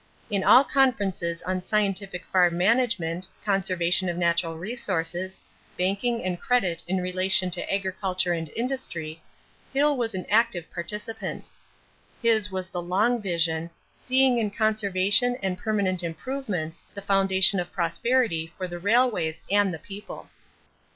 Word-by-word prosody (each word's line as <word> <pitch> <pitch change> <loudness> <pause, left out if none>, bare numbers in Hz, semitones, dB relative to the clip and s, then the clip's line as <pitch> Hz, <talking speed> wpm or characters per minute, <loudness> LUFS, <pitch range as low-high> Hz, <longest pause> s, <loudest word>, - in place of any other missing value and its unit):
In 200 -2 +1
all 260 - +7
conferences 200 -12 0
on 185 0 -2
scientific 195 -2 -1
farm 175 -2 +3
management, 185 -4 +1 0.2
conservation 185 -2 +1
of 175 - -3
natural 170 -1 +1
resources, 185 -3 -3 0.4
banking 200 +6 0
and 180 -1 -2
credit 190 -9 +1
in 190 +1 0
relation 185 0 +1
to 175 - -2
agriculture 190 -2 0
and 165 -2 -4
industry, 175 - -3 0.5
Hill 290 +2 +3
was 230 -5 -2
an 185 - -4
active 205 -6 +2
participant. 210 +6 -5 0.7
His 220 -3 +2
was 185 -1 -3
the 180 -1 -4
long 210 +7 +1
vision, 170 -3 0 0.3
seeing 260 -1 +3
in 215 -2 0
conservation 215 +2 +2
and 190 -1 0
permanent 195 -3 -1
improvements 175 -2 -4
the 200 - -6
foundation 195 -1 +4
of 175 - -4
prosperity 170 0 0
for 185 - -3
the 175 0 -7
railways 205 -5 +1
and 205 -1 +3
the 165 - -5
people. 200 +6 -10
190 Hz, 130 wpm, -25 LUFS, 175-220 Hz, 0.7 s, all